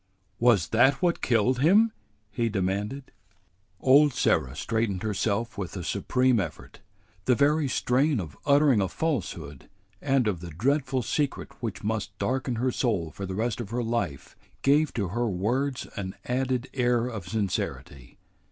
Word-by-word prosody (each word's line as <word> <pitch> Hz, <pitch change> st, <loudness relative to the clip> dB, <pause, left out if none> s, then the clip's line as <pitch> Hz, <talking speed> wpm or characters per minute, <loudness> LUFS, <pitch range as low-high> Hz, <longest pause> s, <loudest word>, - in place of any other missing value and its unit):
"Was 115 Hz, -8 st, +4 dB
that 125 Hz, +5 st, +4 dB
what 175 Hz, -1 st, +1 dB
killed 120 Hz, +2 st, +2 dB
him?" 205 Hz, -, +5 dB, 0.4 s
he 115 Hz, +1 st, 0 dB
demanded. 105 Hz, +7 st, -2 dB, 0.7 s
Old 140 Hz, +2 st, +5 dB
Sarah 65 Hz, -, +1 dB
straightened 110 Hz, 0 st, -1 dB
herself 110 Hz, +2 st, -1 dB
with 95 Hz, 0 st, -5 dB
a 90 Hz, -, -5 dB
supreme 125 Hz, +6 st, +1 dB
effort. 85 Hz, -6 st, -6 dB, 0.5 s
The 125 Hz, -, +4 dB
very 145 Hz, +2 st, +3 dB
strain 130 Hz, +2 st, +1 dB
of 80 Hz, -6 st, -6 dB
uttering 140 Hz, -5 st, +4 dB
a 95 Hz, -, +1 dB
falsehood 85 Hz, -, -3 dB, 0.3 s
and 135 Hz, -4 st, +2 dB
of 95 Hz, -5 st, -1 dB
the 85 Hz, 0 st, -8 dB
dreadful 130 Hz, -, 0 dB
secret 145 Hz, +2 st, -2 dB
which 115 Hz, -4 st, -4 dB
must 105 Hz, -1 st, -3 dB
darken 130 Hz, -1 st, -1 dB
her 125 Hz, +3 st, 0 dB
soul 105 Hz, -, -1 dB
for 100 Hz, +4 st, -6 dB
the 95 Hz, -, -4 dB
rest 115 Hz, +2 st, -1 dB
of 105 Hz, -, -7 dB
her 120 Hz, +2 st, -2 dB
life 115 Hz, -, -3 dB, 0.3 s
gave 145 Hz, +2 st, +3 dB
to 100 Hz, -6 st, -1 dB
her 120 Hz, +5 st, -1 dB
words 125 Hz, +8 st, -1 dB
an 95 Hz, -2 st, -5 dB
added 130 Hz, 0 st, -1 dB
air 120 Hz, -2 st, +2 dB
of 110 Hz, -8 st, -6 dB
sincerity. 90 Hz, -, -4 dB
120 Hz, 150 wpm, -27 LUFS, 100-130 Hz, 0.7 s, him